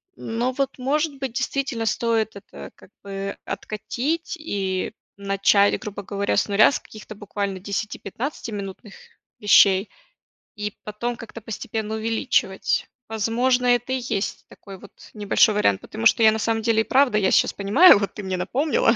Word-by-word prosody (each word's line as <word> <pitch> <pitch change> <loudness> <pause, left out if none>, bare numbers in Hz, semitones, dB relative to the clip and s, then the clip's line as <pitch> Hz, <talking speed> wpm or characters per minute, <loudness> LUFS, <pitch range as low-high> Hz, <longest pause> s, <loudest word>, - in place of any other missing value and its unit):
Но 235 +3 -2
вот, 270 0 -2
может 285 +2 -1
быть, 265 -4 -4
действительно 265 -3 -2
стоит 220 0 0
это 200 - -11
как - - -18
бы 195 0 -5
откатить 280 - -3
и 195 - -3 0.2
начать, 200 0 +3
грубо 205 -1 -7
говоря, 200 +1 -1
с - - +2
0, 205 +5 +5
с - - -2
каких-то 215 0 -12
буквально 200 -2 -4
десяти-пятнадцатиминутных 205 0 -5 0.4
вещей 200 -1 +5 0.7
и 210 -1 -4
потом 235 +3 -4
как-то 230 0 -10
постепенно 220 0 -4
увеличивать. 220 -3 0 0.2
Возможно, 245 +3 +1
это 245 0 +2
и 260 - 0
есть 205 -4 -3
такой 195 -2 -12
вот 200 - -14 0.2
небольшой 210 0 +3
вариант. 100 - +2
Потому 110 - -6
что 225 - +5
я, 220 - +7
на 220 - -1
самом 225 0 0
деле, 220 -1 +2
и - - 0
правда, 260 -3 +3
я 195 -2 +2
сейчас - - +3
понимаю, 205 - +6
вот 200 -1 -3
ты 210 - -7
мне 190 -1 -3
напомнила, 250 - +1
215 Hz, 155 wpm, -23 LUFS, 200-245 Hz, 0.7 s, я